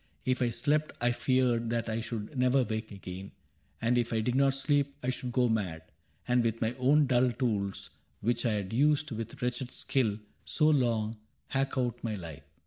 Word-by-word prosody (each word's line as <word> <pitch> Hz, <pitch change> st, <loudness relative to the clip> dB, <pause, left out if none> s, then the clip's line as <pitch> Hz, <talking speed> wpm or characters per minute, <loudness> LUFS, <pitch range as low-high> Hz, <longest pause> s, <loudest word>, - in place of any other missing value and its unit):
If 130 Hz, -1 st, +1 dB
I 120 Hz, -, +3 dB
slept, 150 Hz, +6 st, +1 dB
I 120 Hz, +1 st, +2 dB
feared 120 Hz, -2 st, +1 dB
that 115 Hz, 0 st, -1 dB
I 110 Hz, 0 st, -1 dB
should 115 Hz, +2 st, -5 dB
never 125 Hz, +1 st, +3 dB
wake 110 Hz, 0 st, -4 dB
again; 95 Hz, -1 st, -8 dB, 0.5 s
And 120 Hz, +1 st, +2 dB
if 120 Hz, -1 st, -1 dB
I 115 Hz, -, +1 dB
did 120 Hz, +3 st, 0 dB
not 135 Hz, +1 st, +3 dB
sleep 140 Hz, 0 st, +1 dB
I 130 Hz, -, +1 dB
should 125 Hz, 0 st, -4 dB
go 125 Hz, 0 st, +3 dB
mad, 95 Hz, -8 st, -1 dB, 0.4 s
And 125 Hz, -1 st, +3 dB
with 115 Hz, -1 st, 0 dB
my 115 Hz, +1 st, 0 dB
own 145 Hz, +4 st, +5 dB
dull 125 Hz, -1 st, +3 dB
tools, 105 Hz, -7 st, -2 dB, 0.3 s
which 120 Hz, +2 st, 0 dB
I 115 Hz, -3 st, +2 dB
had 105 Hz, 0 st, -3 dB
used 150 Hz, +4 st, +3 dB
With 115 Hz, -1 st, -5 dB
wretched 125 Hz, +1 st, -2 dB
skill 110 Hz, -7 st, 0 dB, 0.3 s
so 150 Hz, -, +2 dB
long, 115 Hz, -5 st, +1 dB, 0.3 s
hack 135 Hz, 0 st, -1 dB
out 120 Hz, -2 st, -1 dB
my 110 Hz, -2 st, -1 dB
life. 85 Hz, -6 st, -8 dB
120 Hz, 190 wpm, -30 LUFS, 110-130 Hz, 0.5 s, own